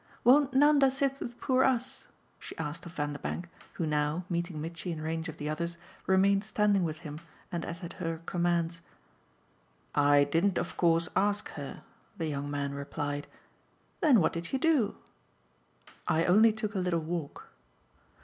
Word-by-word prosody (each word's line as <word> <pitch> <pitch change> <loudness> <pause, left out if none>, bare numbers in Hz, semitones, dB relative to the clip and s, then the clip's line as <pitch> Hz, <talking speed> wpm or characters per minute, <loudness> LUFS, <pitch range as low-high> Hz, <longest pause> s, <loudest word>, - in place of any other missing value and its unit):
Won't 270 +2 +5
Nanda 285 -1 +6
sit 275 +1 0
with 240 0 -6
poor 260 0 +3
US?" 250 -1 0 0.3
she - - -9
asked 160 +2 -5
of 170 - -10
Vanderbank, 145 +4 -3 0.3
who 165 - -2
now, 150 +3 0
meeting 170 -2 -2
Mitchy 165 +3 -5
in 160 - -4
range 160 +1 -3
of 160 - -8
the 150 - -4
others, 170 +3 -2 0.3
remained 195 +1 +4
standing 210 -2 +2
with 160 -1 -3
him 150 -2 -7 0.3
and 170 -2 -2
as 170 +2 -6
at 170 - -6
her 165 -2 -2
commands. 170 -1 0 1.1
"I 145 0 +5
didn't 165 +7 +1
of - - -2
course 165 -1 +3
ask 205 +1 +1
her," 140 -2 -8 0.3
the 165 - -2
young 145 -2 -3
man 140 -1 -2
replied. 145 +1 -4 0.7
"Then 285 - +5
what - - +2
did 170 +1 -4
you 270 - +1
do?" 280 -7 +2 1.1
"I 165 +1 +2
only 215 +5 +6
took 215 -1 -4
a 195 - -1
little 180 -2 +1
walk." 160 -2 -5
170 Hz, 160 wpm, -30 LUFS, 155-205 Hz, 1.1 s, Nanda